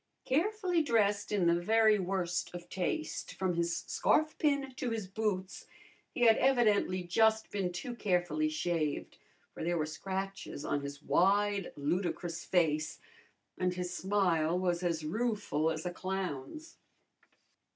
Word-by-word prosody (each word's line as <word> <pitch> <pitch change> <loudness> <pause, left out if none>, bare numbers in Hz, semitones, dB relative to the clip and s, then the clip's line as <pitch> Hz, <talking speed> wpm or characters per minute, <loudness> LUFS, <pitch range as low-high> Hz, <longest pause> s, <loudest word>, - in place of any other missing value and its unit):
Carefully 360 +4 +1
dressed 210 -8 +1
in 200 -4 +2
the 170 0 +3
very 220 +2 +4
worst 180 -2 -1
of 175 0 -8
taste 310 - -3
from 185 -2 0
his 170 0 -1
scarfpin 290 -3 +1
to 255 - -2
his 225 -3 -3
boots, 195 -2 -3 0.4
he - - -6
had 225 -2 +6
evidently 215 -8 +3
just 220 +5 +2
been 190 -3 -1
too 175 +8 -5
carefully 175 -7 +1
shaved, 155 -1 -2 0.3
for - - -6
there 175 +1 0
were 155 - 0
scratches 190 0 -5
on 145 - 0
his 140 +1 -7
wide, 200 +1 +2
ludicrous 170 +3 -2
face, 155 -4 +1 0.6
and 180 0 0
his 180 0 -3
smile 180 -4 +1
was 180 -1 0
as 165 -3 -1
rueful 205 -5 0
as 160 +2 -3
a 175 - -2
clown's. 190 - -5
185 Hz, 135 wpm, -32 LUFS, 170-220 Hz, 0.6 s, had